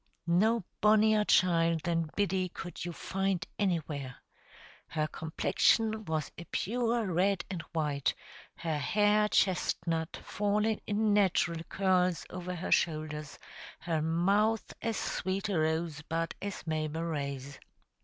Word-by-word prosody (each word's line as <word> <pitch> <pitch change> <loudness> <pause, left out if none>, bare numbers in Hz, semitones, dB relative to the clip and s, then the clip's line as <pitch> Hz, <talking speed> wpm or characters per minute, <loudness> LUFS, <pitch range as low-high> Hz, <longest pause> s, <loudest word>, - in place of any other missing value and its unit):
No 205 +6 +3 0.2
bonnier 215 0 +5
child 170 -4 +3
than 165 -2 0
Biddy 190 -2 +1
could 175 +1 -7
you 175 - -3
find 190 0 -1
anywhere. 150 -9 -1 0.7
Her 155 -1 -1
complexion 215 +8 +1
was 155 -3 -2
a 170 - -8
pure 235 +3 0
red 190 +1 +1
and 180 -3 -3
white, 150 -4 0 0.4
her 160 -3 -2
hair 210 +6 +3
chestnut, 170 -4 +1
falling 210 +1 0
in 210 0 +2
natural 180 -4 +2
curls 185 -4 +1
over 180 0 -5
her 175 - -4
shoulders, 155 -2 0 0.4
her 165 -2 -1
mouth 200 +7 +1
as 225 -3 -1
sweet 190 +2 -2
a 185 -5 +1
rose 160 -1 0
bud 165 +2 -2
as 200 -1 -5
Mabel 155 0 -2
Ray's. 140 -4 -4
175 Hz, 125 wpm, -31 LUFS, 160-205 Hz, 0.7 s, bonnier